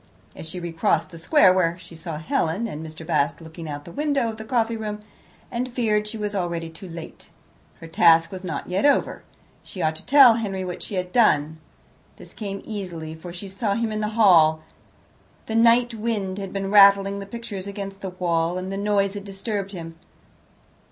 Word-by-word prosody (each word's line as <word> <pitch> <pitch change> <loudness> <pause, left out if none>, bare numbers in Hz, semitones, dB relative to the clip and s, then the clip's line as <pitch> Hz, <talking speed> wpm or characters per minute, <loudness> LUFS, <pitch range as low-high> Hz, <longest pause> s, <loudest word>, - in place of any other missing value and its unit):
As 160 - -8
she 180 - -6
recrossed 175 +3 0
the 165 - -10
square 185 - +4
she 170 -1 -14
saw 160 -1 -6
Helen 160 +6 -1
and 155 -7 -6
Mr. 160 0 -9
Bast 150 -4 0
looking 160 0 -9
out 145 0 -5
of - - -22
the 170 - -11
window 285 - 0
of 220 - -7
the 220 - -7
coffee 230 0 0
room, 210 -1 -5 0.5
and 250 +1 -3
feared 215 -4 0
she 220 +1 -6
was 210 -1 -3
already 170 -3 -3
too 175 +3 -11
late. 165 0 -10 0.5
Her 165 - -10
task 165 0 +4
was 190 -1 -7
not 185 - -4
yet 185 +2 -1
over; 285 0 +2 0.4
she 190 - -11
ought 155 0 +1
to - - -10
tell 270 -4 +8
Henry 195 -4 -3
what 180 - -6
she 205 - -6
had 180 -1 -3
done. 160 -10 +3 0.6
This - - -13
came 200 -2 -6
easily, 175 -7 -6
for 160 +2 -9
she 180 +3 -8
saw 200 +1 -2
him 230 -1 -1
in 215 - -2
the 210 - 0
hall. 160 -7 +5 0.8
The 220 - -5
night 235 +1 +4
wind 210 -4 -2
had 195 -1 -6
been 195 0 -3
rattling 200 -1 +6
the 195 - -7
pictures 205 -3 -7
against 195 -1 -7
the 190 - -4
wall, 175 -1 -1
and 185 +1 -4
the 195 - -3
noise 200 -1 +1
had 205 -1 -6
disturbed 200 0 -4
him. 165 -3 -8
195 Hz, 200 wpm, -23 LUFS, 170-215 Hz, 0.8 s, tell